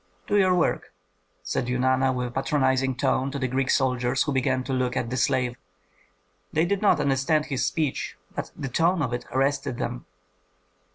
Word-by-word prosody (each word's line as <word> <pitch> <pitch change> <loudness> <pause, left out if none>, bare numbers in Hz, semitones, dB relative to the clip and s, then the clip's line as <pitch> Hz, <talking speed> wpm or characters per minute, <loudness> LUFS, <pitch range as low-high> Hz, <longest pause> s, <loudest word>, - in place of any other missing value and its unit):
"Do 205 - 0
your 185 -2 +4
work," 175 - 0 0.5
said 120 - -2
Eunana, 130 +1 +2
with 125 -1 -2
a - - -11
patronizing 130 -1 +1
tone, 130 +2 +1
to 140 - -4
the 130 -2 -1
Greek 130 +1 -1
soldiers 125 -1 +2
who 145 - -2
began 130 -1 +1
to 135 +1 -3
look 130 0 0
at 115 -1 -2
the - - -1
slave. 125 -1 +1 0.9
They 160 +2 +2
did 200 +2 -1
not 210 - +4
understand 140 +3 +1
his 135 -4 -2
speech, 155 -4 -2 0.2
but - - -4
the - - -4
tone 165 +5 +2
of 120 - -2
it 120 - -3
arrested 135 -1 0
them. - - -4
130 Hz, 180 wpm, -25 LUFS, 125-145 Hz, 0.9 s, your